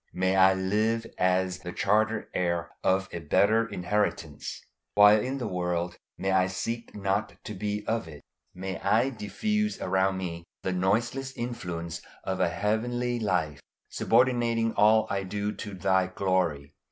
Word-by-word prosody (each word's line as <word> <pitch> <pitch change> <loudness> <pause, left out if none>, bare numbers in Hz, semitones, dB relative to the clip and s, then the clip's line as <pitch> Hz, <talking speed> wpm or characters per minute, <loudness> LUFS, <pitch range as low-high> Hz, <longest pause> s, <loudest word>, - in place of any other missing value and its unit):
May 95 +1 +1
I 95 0 +6
live 110 +4 0
as 90 -2 +1
the 90 - -6
chartered 105 +3 +1
heir 85 -1 -1
of 95 +1 +2
a 85 - -4
better 100 +8 +3
inheritance; 90 -6 -2 0.3
while 105 +1 +8
in 130 +4 -2
the 125 - -3
world, 90 -3 -2 0.2
may 95 - -1
I 95 -1 +3
seek 115 +6 -4
not 100 0 -1
to 110 - -6
be 105 +1 -3
of 115 -4 -1
it. 75 -3 -11 0.3
May 95 +1 -5
I 125 +5 +2
diffuse 210 - -1
around 95 +1 +1
me 85 -2 -5 0.2
the 95 - -1
noiseless 120 +9 0
influence 90 -9 -5 0.2
of - - -2
a - - +3
heavenly 120 +3 -1
life, 85 -9 -1 0.3
subordinating 115 -2 +2
all 110 +2 +5
I 100 - 0
do 100 +2 -2
to 105 -2 -7
Thy 95 0 +2
glory. 90 -7 -1
95 Hz, 150 wpm, -28 LUFS, 90-115 Hz, 0.3 s, while